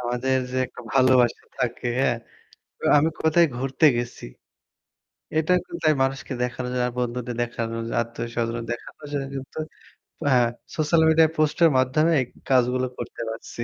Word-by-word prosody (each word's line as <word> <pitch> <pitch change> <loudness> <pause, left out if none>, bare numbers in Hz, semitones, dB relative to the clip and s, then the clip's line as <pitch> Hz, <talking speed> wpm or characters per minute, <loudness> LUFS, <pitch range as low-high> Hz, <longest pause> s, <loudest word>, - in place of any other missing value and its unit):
আমাদের 125 +2 0
যে 130 - -4
একটা 125 - -12
ভালোবাসা 130 -2 +4
থাকে, 125 0 -2
হ্যাঁ, 120 -3 +2 0.8
আমি 155 +3 +3
কোথায় 165 +2 +5
ঘুরতে 135 +4 +1
গেছি। 120 0 -5 1.1
এটা 160 +3 +1
কিন্তু - - -8
তাই 155 - +6
মানুষকে 135 +1 -2
দেখানোর 125 0 -3
জন্য 125 -1 0
আর 120 - -11
বন্ধুদের 125 0 -3
দেখানোর 115 -1 -4
জন্য, 115 - -5
আত্মীয়স্বজন 115 0 -3
দেখানোর 145 +5 -8
জন্য 140 -2 -2
কিন্তু 135 +3 -7 0.7
হ্যাঁ, 120 -2 +4 0.3
সোশ্যাল 155 +1 +2
মিডিয়ায় 160 0 +5
পোস্টের 155 +2 +4
মাধ্যমে 155 +6 +3
এই 130 - -2 0.2
কাজগুলো 130 0 +3
করতে - - -7
পারছি। 115 +1 -7
130 Hz, 145 wpm, -24 LUFS, 120-145 Hz, 1.1 s, তাই